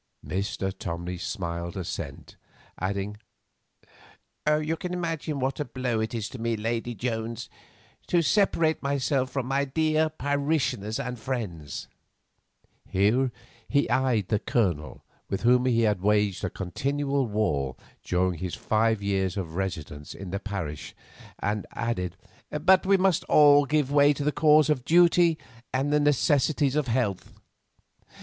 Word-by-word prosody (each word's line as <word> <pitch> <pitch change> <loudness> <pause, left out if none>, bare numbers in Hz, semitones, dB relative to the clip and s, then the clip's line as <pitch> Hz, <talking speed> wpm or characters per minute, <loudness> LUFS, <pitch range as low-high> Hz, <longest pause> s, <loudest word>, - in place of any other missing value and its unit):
Mr. 95 0 -2
Tomley 85 +1 -4
smiled 85 -1 -4
assent, 90 -3 -6 0.4
adding: 100 +2 -2 1.3
"You 155 +1 +1
can 180 +2 -4
imagine 165 -4 -3
what 135 +3 -1
a 150 - -1
blow 125 -2 -2
it 110 +2 -2
is 110 -2 -2
to 130 - -9
me, 115 0 -1
Lady 115 +2 -2
Jones, 115 -1 -4 0.6
to 175 -1 +3
separate 165 -4 +2
myself 140 -1 0
from 135 -1 -2
my 135 +2 +1
dear 155 +2 +1
parishioners 140 -7 -1
and 125 -1 -4
friends"—here 110 - -3 0.4
he 140 0 +2
eyed 125 -7 +1
the 105 - +2
Colonel, 90 -13 -1 0.2
with 95 - -3
whom 125 +1 +4
he 115 -2 +3
had 105 -5 +1
waged 105 -1 +2
a 95 - 0
continual 140 +9 -1
war 75 - 0 0.3
during 90 -2 0
his 90 -1 -3
five 110 -1 +1
years 95 -1 0
of 85 -5 -4
residence 80 -6 -5
in 95 -2 -8
the 100 - -2
parish, 95 -9 -5 0.4
and 105 0 -2
added: 90 -7 -2 0.3
"But 185 +5 +3
we 195 0 +5
must 185 -3 +2
all 145 -1 +6
give 150 -2 +1
way 145 0 +5
to 145 - -4
the 150 - +2
cause 150 +1 +5
of 150 -5 +1
duty 170 +1 +5 0.3
and 135 +3 0
the 150 - +4
necessities 145 0 +2
of 150 -3 +1
health. 115 -6 -2
120 Hz, 140 wpm, -27 LUFS, 100-145 Hz, 1.3 s, all